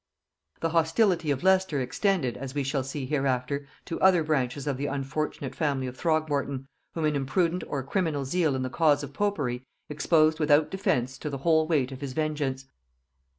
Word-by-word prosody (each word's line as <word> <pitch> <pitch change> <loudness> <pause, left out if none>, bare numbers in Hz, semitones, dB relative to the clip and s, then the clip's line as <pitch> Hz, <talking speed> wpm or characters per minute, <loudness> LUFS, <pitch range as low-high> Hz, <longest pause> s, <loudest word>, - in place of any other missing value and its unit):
The 165 - 0
hostility 165 +1 +2
of 140 +1 0
Leicester 190 -5 +3
extended, 130 - 0
as 135 0 -7
we 145 - 0
shall 135 0 -1
see 135 +1 -4
hereafter, 135 0 -1 0.2
to 165 - -5
other 185 -3 +5
branches 140 -3 -1
of 140 -3 -1
the 145 +2 -2
unfortunate 140 -1 -3
family 140 -3 -1
of 125 0 -5
Throgmorton, 145 -4 -1 0.3
whom 165 -2 0
an 150 -1 +1
imprudent 165 +6 0
or 140 -2 -3
criminal 150 -2 -1
zeal 160 -1 +1
in 130 - -2
the 130 - -2
cause 150 -3 +3
of 140 - -7
popery 145 -11 -1 0.3
exposed 155 +1 +3
without 150 0 +3
defence 130 -9 -1
to 150 - -4
the 140 - -4
whole 160 +2 +3
weight 140 -6 +1
of 135 +1 -8
his 140 -2 -4
vengeance. 145 -3 -2
145 Hz, 180 wpm, -27 LUFS, 135-160 Hz, 0.3 s, other